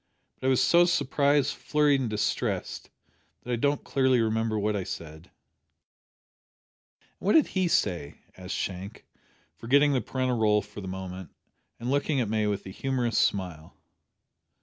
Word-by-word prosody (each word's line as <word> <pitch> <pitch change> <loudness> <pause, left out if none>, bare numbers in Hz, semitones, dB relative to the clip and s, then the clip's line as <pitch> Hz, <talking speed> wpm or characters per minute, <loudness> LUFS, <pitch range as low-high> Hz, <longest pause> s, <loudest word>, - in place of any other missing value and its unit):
But 130 - -2
I - - +4
was 130 - +3
so 175 +1 +5
surprised, 145 -4 +2
flurried, 150 -2 +2
and 120 - -2
distressed, 105 -1 -2 0.5
that 125 - -6
I - - +2
don't 140 +4 0
clearly 130 -2 +2
remember 110 -1 0
what 105 0 0
I 100 - -2
said." 80 -1 -8 1.7
"And - - -36
what 205 - +1
did 320 - +5
he 185 -2 0
say?" 90 - 0 0.2
asked 90 0 -6
Shank, 95 +3 -5 0.5
forgetting 140 - +3
the 130 - +1
parental 130 +1 -1
role 105 -2 +3
for 105 +1 -11
a 95 - -7
moment, 95 -1 -6 0.5
and 120 +2 -3
looking 145 0 +1
at 115 -5 -1
May 110 -1 0
with 100 -1 -2
a 95 - -7
humorous 125 +1 -1
smile. 90 -6 -2
115 Hz, 155 wpm, -27 LUFS, 100-135 Hz, 1.7 s, so